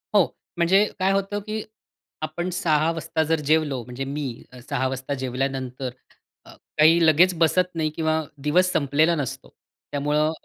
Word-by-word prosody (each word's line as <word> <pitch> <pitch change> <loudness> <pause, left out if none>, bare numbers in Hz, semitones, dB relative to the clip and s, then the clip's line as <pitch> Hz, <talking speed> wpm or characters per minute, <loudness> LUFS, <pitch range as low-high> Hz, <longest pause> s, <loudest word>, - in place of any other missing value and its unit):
हो, 195 - +6 0.3
म्हणजे 190 +4 +4
काय 190 +1 +2
होतं, 195 +1 0
की 215 +1 -4 0.6
आपण 155 +4 -3
06:00 155 -2 +2
वाजता 160 -1 -1
जर 165 -1 +2
जेवलो 150 -5 +2
म्हणजे 125 +3 -6
मी 145 +2 -3 0.4
06:00 130 -2 0
वाजता 130 +1 -4
जेवल्यानंतर 130 0 -3 0.6
अ, - - -15 0.3
काही 165 +2 +6
लगेच 170 +4 +5
बसत 180 +2 +3
नाही 155 -1 0
किंवा 160 0 0 0.3
दिवस 180 +4 +3
संपलेला 155 +3 +2
नसतो. 140 -5 -5 0.4
त्यामुळं 150 +2 +1
155 Hz, 145 wpm, -24 LUFS, 140-175 Hz, 0.6 s, हो